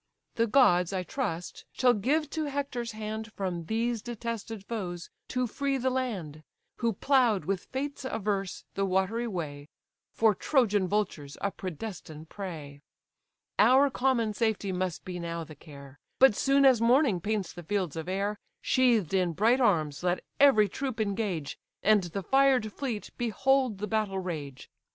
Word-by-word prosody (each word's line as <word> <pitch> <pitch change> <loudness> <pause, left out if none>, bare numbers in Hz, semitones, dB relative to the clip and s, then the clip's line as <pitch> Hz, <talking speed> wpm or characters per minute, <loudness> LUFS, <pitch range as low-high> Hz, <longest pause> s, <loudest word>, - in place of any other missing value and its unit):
The 230 0 +1
gods, 195 -8 +4
I 185 -1 -1
trust, 180 -7 -4
shall 250 -1 +4
give 285 +9 +1
to 315 -1 -2
Hector's 275 -5 -3
hand 220 +1 -5
From 180 -4 -3
these 230 +3 -1
detested 230 -3 -5
foes 180 -7 -5 0.2
to 250 0 -1
free 275 +4 -1
the 260 0 0
land, 195 - -3 0.4
Who 235 -2 0
plough'd, 245 -4 +2
with 195 -2 -2
fates 280 +2 -4
averse, 200 -6 -2
the 195 - -1
watery 195 +5 0
way: 150 -7 -5 0.4
For 220 -1 +3
Trojan 210 -5 +2
vultures 180 -9 -2
a 200 - -1
predestined 160 -4 -7
prey. 155 -8 -7 0.8
Our 260 +6 +6
common 245 -5 +1
safety 215 -3 0
must 180 -2 -3
be 180 -1 -5
now 170 -1 -4
the 160 -1 -11
care; 140 -2 -13 0.2
But 265 -3 +7
soon 275 +3 +3
as 255 -4 +6
morning 235 - +3
paints 205 -1 -2
the 175 - -8
fields 180 -2 -2
of 165 +2 -5
air, 200 +2 -1 0.2
Sheathed 235 - +2
in 180 -3 +2
bright 230 - +3
arms 155 - +2
let 180 0 0 0.2
every 245 -7 +6
troop 255 +3 -4
engage, 200 -8 -2 0.2
And 215 0 +5
the 190 +3 -5
fired 265 -3 +3
fleet 245 -7 -4
behold 245 0 +1
the 205 - -3
battle 210 -2 -1
rage. 155 -8 -5
210 Hz, 155 wpm, -29 LUFS, 180-245 Hz, 0.8 s, But